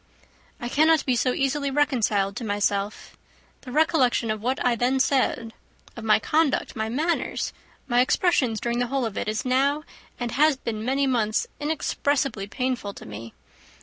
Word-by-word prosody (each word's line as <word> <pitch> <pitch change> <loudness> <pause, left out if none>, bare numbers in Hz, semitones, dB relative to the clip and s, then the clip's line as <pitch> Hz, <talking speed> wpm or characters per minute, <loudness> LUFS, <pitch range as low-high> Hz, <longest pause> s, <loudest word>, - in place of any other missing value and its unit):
"I 240 - -4
cannot 310 +3 +3
be 255 - +2
so 255 +2 +2
easily 275 +2 0
reconciled 225 -9 +1
to - - -4
myself. 205 -1 -2 0.5
The 255 - -9
recollection 260 -6 +2
of 215 -1 -4
what 255 +4 0
I 245 -1 +3
then 250 +3 +1
said, 255 -4 +1 0.4
of 235 - -8
my 215 -1 +5
conduct, 300 +5 0
my 220 -1 -2
manners, 315 +8 -1 0.3
my 245 -1 +3
expressions 255 - +2
during 235 0 -1
the 245 - 0
whole 270 0 -1
of 220 -3 -4
it, - - -3
is 215 +3 -2
now, 275 +4 +2 0.4
and 240 -2 -3
has 300 +1 +3
been 220 -4 -4
many 270 +3 +1
months, 230 -5 +1
inexpressibly 285 -6 -1
painful 250 -3 -3
to - - -11
me. 110 +2 -9
250 Hz, 165 wpm, -25 LUFS, 220-280 Hz, 0.5 s, my